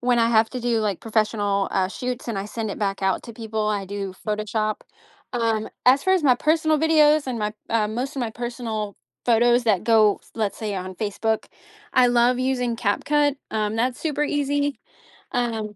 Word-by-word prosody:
when 245 0 +2
I 230 0 +4
have 225 -1 +3
to 250 - -5
do, 235 -1 +1
like, 205 -4 -1
professional, 210 -3 0
uh, 190 -1 +1
shoots, 250 +3 -5
and 210 -4 -2
I 195 - -3
send 220 0 -4
it - - -6
back 195 -2 -2
out 190 -1 +1
to 235 - -9
people, 220 -1 -3
I 205 -2 -1
do 195 -1 -4
Photoshop, 215 0 -1 0.5
um, 225 -3 0 0.2
as 265 +3 +5
far 375 - +3
as 370 -4 +2
my 260 -4 +5
personal 315 +1 +2
videos, 305 -2 +4
and 245 -3 -3
my, 210 0 -2 0.2
uh, 215 -2 +2
most 250 +6 -3
of 270 - -3
my 235 - -1
personal 225 -3 -4 0.3
photos 240 +1 +4
that 210 -5 +2
go, 215 -3 +4
let's 215 -3 -2
say 210 -2 -3
on 185 0 -5
Facebook, 220 +2 -1 0.5
I 250 -1 +6
love 245 +1 +3
using 250 -2 0
Cap 205 -4 -1
Cut, 290 -1 +2
um, 215 -1 -1
that's 245 +2 0
super 295 -2 -1
easy, 285 -1 0 0.5
um 225 -4 -2
230 Hz, 195 wpm, -23 LUFS, 210-255 Hz, 0.5 s, I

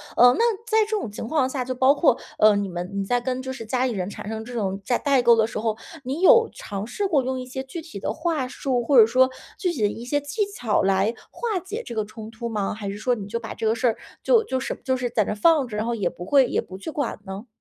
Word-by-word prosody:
呃， 245 +1 +7
那 465 -1 +3
在 440 - +2
这 - - -9
种 225 - -5
情 215 - -6
况 270 -2 +1
下 260 -2 -3
就 255 - -2
包 260 +3 +4
括， 285 -6 +4 0.2
呃， 215 -1 +6
你 200 -1 -1
们 175 0 -4
你 200 0 -1
在 245 +5 +1
跟 255 +1 -3
就 260 0 -5
是 245 -4 -7
家 255 +3 0
里 - - -1
人 185 -5 -2
产 205 +1 -7
生 220 0 -5
这 245 - -9
种 195 -4 -2
代 245 - +1
代 280 -2 +3
沟 235 -1 +7
的 220 -1 +3
时 - - -6
候， 220 0 0 0.3
你 270 +6 -3
有 455 +5 +7
尝 200 -1 -5
试 390 - -2
过 300 -8 +2
用 260 0 -2
一 - - -7
些 265 +1 -5
具 270 +6 -7
体 320 +1 -9
的 - - -2
话 315 -7 -1
术， 255 -1 -1
或 265 +1 +5
者 220 - +8
说 255 +3 +4 0.3
具 365 -3 0
体 260 - -5
的 210 - +4
一 230 +3 -7
些 290 +4 0
技 345 +9 -1
巧 225 -4 +1
来 195 +2 +2 0.2
化 455 -5 -2
解 395 +6 -6
这 235 - -7
个 215 -1 0
冲 215 +1 -9
突 225 +1 -6
吗？ 210 -4 -2
还 205 -1 -6
是 200 +1 -4
说 245 +2 +1
你 205 -4 -6
就 220 +4 -3
把 225 - -7
这 - - -4
个 220 - +3
事 240 +2 +1
儿 225 - +1 0.2
就 465 -2 +4
就 260 -10 -2
是 260 - -4
就 260 - +1
是 250 -1 -2
在 225 -2 +2
那 - - -3
儿 - - -2
放 285 +5 +4
着， 220 - -7
然 210 - -1
后 235 - 0
也 200 -5 0
不 175 - -6
会 270 +8 +4
也 - - 0
不 185 - -10
去 195 +11 -6
管 290 -6 -3
呢？ 195 +4 -7
245 Hz, 315 characters per minute, -24 LUFS, 215-275 Hz, 0.3 s, 者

